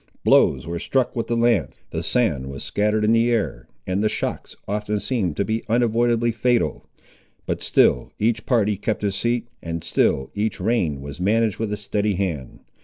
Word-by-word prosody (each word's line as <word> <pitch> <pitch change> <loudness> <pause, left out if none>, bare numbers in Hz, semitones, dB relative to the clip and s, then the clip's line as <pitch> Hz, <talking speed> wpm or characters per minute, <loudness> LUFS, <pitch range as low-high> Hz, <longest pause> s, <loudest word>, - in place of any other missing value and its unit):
Blows - - +4
were 85 +1 -4
struck 130 +4 0
with 115 -2 -2
the 120 - 0
lance, 115 - +1
the - - -2
sand 75 - 0
was 70 0 -5
scattered 105 +1 +1
in 110 - +3
the 115 +1 +3
air, 75 - -1 0.2
and 95 +3 -1
the 110 - +3
shocks - - -4
often 105 +1 -1
seemed 100 - -1
to 100 - +1
be 110 +3 -1
unavoidably 120 0 +2
fatal; 115 - 0 0.6
but - - -2
still - - +3
each 110 0 0
party 105 -5 +2
kept 105 +1 -2
his 100 -1 0
seat, 120 +2 -1
and 85 -1 -4
still 65 0 +1
each 105 +2 -2
rein 85 - 0
was 70 +2 -8
managed 110 +1 +1
with 110 -2 -2
a 105 - -2
steady 105 0 -1
hand. 85 -9 -3
105 Hz, 180 wpm, -22 LUFS, 90-115 Hz, 0.6 s, Blows